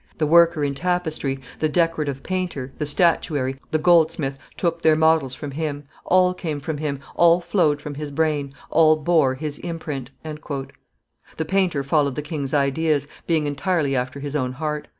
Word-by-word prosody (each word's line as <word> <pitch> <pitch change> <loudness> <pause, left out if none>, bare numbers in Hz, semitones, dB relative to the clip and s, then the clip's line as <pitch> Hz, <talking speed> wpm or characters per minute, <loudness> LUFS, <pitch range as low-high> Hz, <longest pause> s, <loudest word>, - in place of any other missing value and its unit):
The 155 - +1
worker 170 0 +5
in 140 -1 0
tapestry, 160 -4 -1 0.2
the 155 - +1
decorative 155 -4 0
painter, 180 -8 -3
the 150 - -1
statuary, 145 -4 +1
the 155 - +1
goldsmith, 160 -4 +2 0.2
took 170 -1 -1
their 160 -1 +5
models 160 -4 +3
from 145 -2 -6
him: 145 0 -3 0.2
all 180 0 +4
came 160 -5 -4
from 150 +2 -4
him, 145 -3 -2 0.2
all 170 0 +5
flowed 165 -5 +1
from 150 - -5
his 150 +1 -5
brain, 145 -1 0 0.2
all 155 0 +5
bore 155 -4 +2
his 150 +1 -5
imprint." 150 -6 -5 1.3
The 160 - -1
painter 175 -4 +1
followed 140 -1 +1
the 150 - -3
king's 145 -3 -4
ideas, 145 +1 +1 0.2
being 160 -3 +2
entirely 145 0 0
after 130 +2 -2
his 145 +1 -5
own 130 -3 -1
heart. 150 +2 -3
155 Hz, 165 wpm, -22 LUFS, 140-165 Hz, 1.3 s, worker